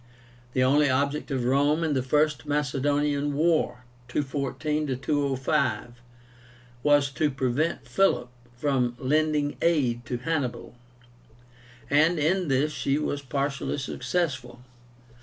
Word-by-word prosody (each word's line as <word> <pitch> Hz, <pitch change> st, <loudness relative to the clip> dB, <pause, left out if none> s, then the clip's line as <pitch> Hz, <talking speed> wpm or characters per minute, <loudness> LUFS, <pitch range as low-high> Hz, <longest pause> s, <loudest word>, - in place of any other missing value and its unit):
The 130 Hz, -, +2 dB
only 145 Hz, +3 st, +4 dB
object 140 Hz, +3 st, 0 dB
of 130 Hz, -4 st, -1 dB
Rome 145 Hz, +5 st, +2 dB
in 160 Hz, -2 st, +1 dB
the 130 Hz, -, +1 dB
First 150 Hz, +1 st, +1 dB
Macedonian 145 Hz, 0 st, 0 dB
War 155 Hz, -6 st, +1 dB, 0.2 s
(214 145 Hz, +1 st, -2 dB
205) 135 Hz, -3 st, -1 dB, 0.8 s
was 145 Hz, -1 st, +3 dB
to 150 Hz, +2 st, +1 dB
prevent 135 Hz, +4 st, -1 dB
Philip 160 Hz, -11 st, +2 dB, 0.3 s
from 125 Hz, -3 st, 0 dB
lending 150 Hz, +2 st, +1 dB
aid 130 Hz, -8 st, +1 dB
to 125 Hz, -, -2 dB
Hannibal; 125 Hz, -3 st, -3 dB, 1.1 s
and 155 Hz, +4 st, +3 dB
in 175 Hz, +4 st, +1 dB
this 140 Hz, +2 st, +1 dB
she 140 Hz, -1 st, 0 dB
was 145 Hz, -1 st, -2 dB
partially 140 Hz, +1 st, -2 dB
successful. 130 Hz, -2 st, -3 dB
145 Hz, 110 wpm, -26 LUFS, 130-150 Hz, 1.1 s, only